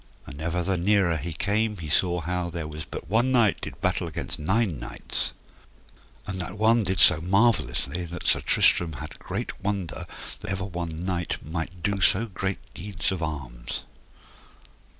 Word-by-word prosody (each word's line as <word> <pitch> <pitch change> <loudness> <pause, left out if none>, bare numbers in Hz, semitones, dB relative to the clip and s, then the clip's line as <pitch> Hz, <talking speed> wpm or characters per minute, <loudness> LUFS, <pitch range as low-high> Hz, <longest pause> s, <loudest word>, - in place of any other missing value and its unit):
And 70 +4 -9
ever 85 +2 -1
the 95 +1 0
nearer 95 -1 +3
he 80 +4 -4
came 105 +6 0
he 80 -3 -6
saw 90 +3 +2
how 90 +2 -2
there 85 -2 -4
was 75 0 -6
but - - -7
one 115 +7 +2
knight 120 -5 +3
did - - -6
battle - - +1
against - - -4
nine 95 - +1
knights, - - -4 0.9
and 95 -2 -3
that 95 - -6
one 110 +2 +4
did 95 -2 -1
so 85 -4 +7
marvellously 90 - +2
that 85 +1 -7
Sir - - +5
Tristram 85 -2 +5
had 70 - -8
great - - -5
wonder 100 -4 -2 0.3
that 105 +2 -7
ever 95 0 -2
one 85 -4 -4
knight 90 -2 -3
might 85 +3 -5
do 100 -1 0
so 100 +4 +4
great 95 -2 -3 0.2
deeds 100 -2 -1
of 95 - -3
arms. 65 -7 -4
90 Hz, 170 wpm, -26 LUFS, 80-100 Hz, 0.9 s, so